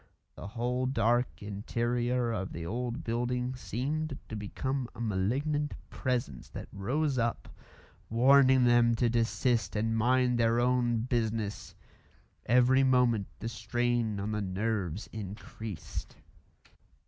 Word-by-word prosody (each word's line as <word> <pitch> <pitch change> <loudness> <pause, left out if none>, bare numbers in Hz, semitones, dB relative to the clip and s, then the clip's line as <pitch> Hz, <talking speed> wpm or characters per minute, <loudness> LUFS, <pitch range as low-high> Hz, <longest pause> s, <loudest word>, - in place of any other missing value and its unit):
The - - -8
whole 125 +3 -1
dark 120 -2 +1
interior 120 +4 -1
of 95 -4 -3
the 85 0 -5
old 120 +5 -3
building 125 +2 -1
seemed 140 +5 -3
to 110 - -5
become 125 +5 -3
a - - -12
malignant 130 +9 0 0.2
Presence 120 - -2
that - - -8
rose 130 +7 0
up, 115 0 -1 0.6
warning 130 +2 +6
them 120 -1 +5
to 120 0 +1
desist 115 -3 +1
and 115 +2 0
mind 125 +1 +3
their 115 0 +3
own 120 -2 +2
business; 110 -4 -2 0.7
every 125 +3 +5
moment 125 -6 +3
the 115 - -5
strain 115 -1 -1
on 100 +2 -2
the 105 0 -1
nerves 100 -1 -2
increased. 105 -2 -7
120 Hz, 120 wpm, -30 LUFS, 110-125 Hz, 0.7 s, warning